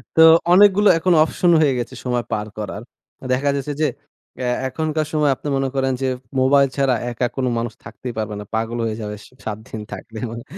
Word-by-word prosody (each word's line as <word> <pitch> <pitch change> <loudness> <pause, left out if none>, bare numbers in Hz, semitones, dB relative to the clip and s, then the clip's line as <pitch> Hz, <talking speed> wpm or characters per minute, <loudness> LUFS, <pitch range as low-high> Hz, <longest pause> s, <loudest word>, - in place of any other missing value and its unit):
তো 160 - +6 0.3
অনেকগুলো 205 +1 +6
এখন 175 +2 +2
অপশন 175 +2 +1
হয়ে 145 -4 +3
গেছে, 120 - -5
সময় 125 -1 0
পার 105 -1 -2
করার। 105 -1 -5 0.5
দেখা 135 +3 +1
যাচ্ছে 140 +1 -3
যে, 155 - +4 0.5
অ্যা 130 - -4 0.2
এখনকার 155 +2 -2
সময় 150 -2 +2
আপনি 150 - -8
মনে 135 0 0
করেন 135 0 +1
যে 135 - +1 0.3
মোবাইল 140 +1 +4
ছাড়া 135 -2 +2 0.2
একা, 120 +1 -1
কোন 135 - -1
মানুষ 115 0 -3
থাকতেই 115 +2 -7
পারবে 110 -1 -3
না। - - -6
পাগল 115 +1 -2
হয়ে 110 -1 -2
যাবে 105 0 -5
সে - - -18
৭ 105 -2 -3
দিন 110 - -6
থাকলে। 110 +3 -9
মানে 115 0 -7
130 Hz, 200 wpm, -21 LUFS, 115-150 Hz, 0.5 s, তো